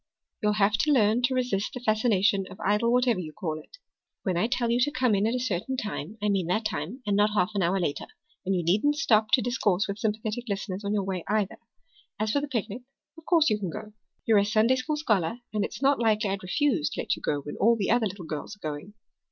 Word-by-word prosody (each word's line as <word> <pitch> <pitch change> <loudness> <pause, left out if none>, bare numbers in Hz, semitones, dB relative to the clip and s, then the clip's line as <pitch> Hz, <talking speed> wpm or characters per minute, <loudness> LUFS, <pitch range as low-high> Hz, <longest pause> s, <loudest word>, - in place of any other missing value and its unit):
"You'll 210 0 +2
have 210 +1 +2
to 305 - +2
learn 225 -3 +3
to 250 +1 +1
resist 245 -2 -1
the - - -4
fascination 215 -4 +2
of 185 - -12
Idle 210 +4 +2
whatever 245 -4 +3
you 160 -4 -6
call 160 -5 -4
it. - - -16 0.5
When 185 -3 0
I 175 +6 +1
tell 240 -1 0
you 240 - +2
to 250 - +3
come 255 -5 +1
in 200 +2 +2
at 230 - 0
a - - 0
certain 250 +2 -2
time 210 - -5
I - - +2
mean 195 -4 +1
that 215 +5 0
time 205 - -4
and 205 -1 +1
not 210 +1 +2
half 180 0 +2
an 200 - 0
hour 185 +2 +1
later. 145 -5 -2 0.4
And 195 0 0
you 175 - 0
needn't 210 - +2
stop 220 -8 +3
to 255 - +5
discourse 210 -5 +1
with 200 +1 -5
sympathetic 220 +2 -2
listeners 195 0 -3
on 200 +1 -1
your 200 - 0
way, 185 -3 -3
either. 210 -2 0 0.6
As 215 0 0
for 285 - +1
the 295 - -3
picnic, 235 -3 -3 0.3
of 325 -1 -15
course 325 -6 +4
you 210 - +1
can 190 -3 -3
go. 210 +5 -8 0.3
You're 220 -3 +5
a - - +3
Sunday 220 +4 +3
school 300 +4 -2
scholar, 215 - 0 0.2
and 210 -1 0
it's 260 - -5
not 275 +1 +4
likely 215 -3 +2
I'd 195 -1 -3
refuse 215 - +1
to - - -4
let - - 0
you - - -13
go 145 -1 -1
when 145 - -7
all 230 +3 +4
the 200 -2 0
other 235 -2 +3
little 190 -2 -8
girls 155 +6 -5
are 200 -7 -6
going." 155 +8 -7
210 Hz, 250 wpm, -27 LUFS, 195-240 Hz, 0.6 s, to